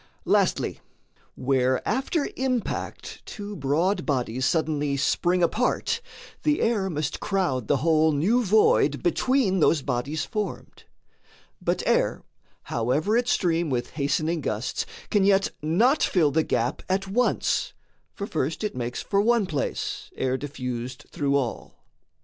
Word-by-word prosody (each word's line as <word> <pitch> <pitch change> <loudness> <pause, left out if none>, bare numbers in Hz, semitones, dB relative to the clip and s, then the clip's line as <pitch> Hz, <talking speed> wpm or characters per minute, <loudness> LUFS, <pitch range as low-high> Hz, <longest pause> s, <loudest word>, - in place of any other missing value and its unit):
Lastly, - - +1 0.6
where 130 -1 +1
after 270 +6 0
impact 255 -3 -3
two 205 -1 -7
broad 165 +6 +1
bodies 130 -2 0
Suddenly 150 -3 0
spring 175 +5 +1
apart, 240 +8 +1 0.4
the 300 0 +2
air 210 -4 +1
must 150 -4 -2
crowd 160 - -1
The 145 - +3
whole 160 -1 +4
new 200 +13 +2
void 185 -8 +3
between 195 +2 +2
those 155 -3 +3
bodies 140 +4 -2
formed; 210 -5 -5 0.8
But - - 0
air, - - +1 0.4
however 135 - 0
it 240 +1 +2
stream 170 -6 +1
with 125 -3 -2
hastening 155 +3 0
gusts, 110 -1 -2 0.2
Can 205 -2 +3
yet 195 0 +3
not 220 - +3
fill 160 -6 +3
the 160 +3 +3
gap 125 -3 -1
at 195 +1 0
once 245 +6 +1 0.4
for 200 - -4
first 165 0 -2
It 210 - -2
makes 120 -1 -3
for 200 0 +1
one 230 -1 +3
place, 150 -6 -3
ere 130 0 0
diffused 130 -1 -5
through 140 -1 0
all. 130 -5 -2
160 Hz, 130 wpm, -25 LUFS, 140-205 Hz, 0.8 s, whole